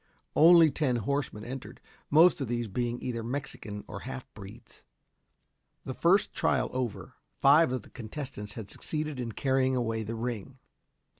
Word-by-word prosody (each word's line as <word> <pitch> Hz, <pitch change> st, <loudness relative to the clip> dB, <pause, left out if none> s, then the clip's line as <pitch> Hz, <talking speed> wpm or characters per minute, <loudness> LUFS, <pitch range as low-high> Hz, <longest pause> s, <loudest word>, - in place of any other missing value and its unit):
Only 165 Hz, -1 st, +7 dB
ten 135 Hz, -5 st, 0 dB
horsemen 120 Hz, -2 st, -2 dB
entered, 125 Hz, -2 st, -7 dB, 0.3 s
most 160 Hz, +1 st, +6 dB
of 135 Hz, -, -1 dB
these 120 Hz, 0 st, -2 dB
being 120 Hz, +3 st, -2 dB
either 115 Hz, -2 st, -3 dB
Mexicans 115 Hz, -4 st, -5 dB
or -, -, -7 dB
halfbreeds. 125 Hz, -5 st, -10 dB, 1.0 s
The 130 Hz, -, -4 dB
first 180 Hz, +8 st, +3 dB
trial 130 Hz, -, +1 dB
over, 125 Hz, -4 st, -4 dB, 0.2 s
five 145 Hz, +1 st, +6 dB
of 130 Hz, -, -2 dB
the -, -, -17 dB
contestants 110 Hz, -3 st, -6 dB
had 110 Hz, -4 st, -8 dB
succeeded 155 Hz, -3 st, -4 dB
in 115 Hz, -2 st, -4 dB
carrying 130 Hz, 0 st, +1 dB
away 115 Hz, -2 st, -1 dB
the 110 Hz, +2 st, -4 dB
ring. 120 Hz, +2 st, -5 dB
125 Hz, 145 wpm, -29 LUFS, 115-140 Hz, 1.0 s, Only